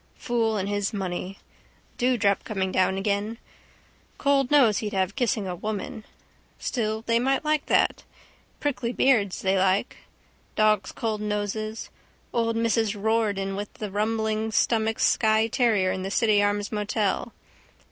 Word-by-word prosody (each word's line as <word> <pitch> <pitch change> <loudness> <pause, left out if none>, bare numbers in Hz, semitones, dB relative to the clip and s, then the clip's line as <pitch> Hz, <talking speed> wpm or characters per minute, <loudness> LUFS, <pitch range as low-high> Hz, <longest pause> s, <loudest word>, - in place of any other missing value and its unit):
Fool 225 -3 0
and 195 -1 -2
his 205 0 -1
money. 190 -1 -4 0.6
Dewdrop 235 -6 +2
coming 190 -4 -2
down 185 +1 +2
again. 205 +3 -1 0.8
Cold 280 -2 +2
nose 255 -9 +5
he'd 215 -1 -4
have 190 0 0
kissing 245 -5 0
a 180 - -3
woman. 215 +3 -5 0.5
Still 220 -3 -2
they 230 0 +2
might 270 +4 0
like. 305 -1 0 0.9
Prickly 250 -4 -2
beards 220 -9 +2
they 190 0 +2
like. 190 +5 +1 0.6
Dogs' 215 -3 +2
cold 220 -2 -3
noses. 210 +1 -3 0.4
Old 230 -1 +1
Mrs 225 -2 +1
Riordan 205 -2 0
with 205 +1 -5
the 210 -2 -6
rumbling 220 +1 -1
stomach's 220 0 +1
Skye 220 -1 +3
terrier 220 -6 +2
in 190 0 -3
the 190 - -3
City 210 0 +3
Arms 205 0 0
hotel. 210 +1 -1
215 Hz, 135 wpm, -25 LUFS, 200-230 Hz, 0.9 s, nose